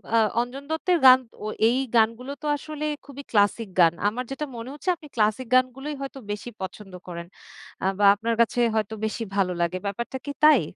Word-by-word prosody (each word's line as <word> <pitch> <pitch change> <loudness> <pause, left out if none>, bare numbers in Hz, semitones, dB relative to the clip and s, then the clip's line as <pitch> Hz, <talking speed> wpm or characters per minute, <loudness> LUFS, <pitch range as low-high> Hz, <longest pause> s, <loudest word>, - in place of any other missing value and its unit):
আ - - +6 0.2
অঞ্জন 250 +3 -6
দত্তের 345 +3 +1
গান 255 0 +10 0.3
ও - - -2 0.2
এই 245 +3 +2 0.2
গানগুলো 230 +4 +2
তো - - -8
আসলে 305 +1 -7 0.2
খুবই 280 0 -9
ক্লাসিক 205 0 +2
গান। 170 -1 +6
আমার 235 +5 -2
যেটা 300 +3 -3
মনে 230 +2 -7
হচ্ছে 300 +5 -4
আপনি 315 -2 -14
ক্লাসিক 215 +3 +1
গানগুলোই 260 +3 +1
হয়তো 275 0 -6
বেশি 210 +4 -5
পছন্দ 190 +1 -7
করেন, 170 -1 -7 0.6
আ - - 0
বা 205 - +4
আপনার 230 +2 -1
কাছে 235 +1 +1 0.2
হয়তো 220 0 -1
বেশি 220 +1 -3
ভালো 185 -2 +1
লাগে। 170 +2 0
ব্যাপারটা 235 +6 -4
কি - - -1
তাই? 305 -7 +7
235 Hz, 190 wpm, -25 LUFS, 205-270 Hz, 0.6 s, গান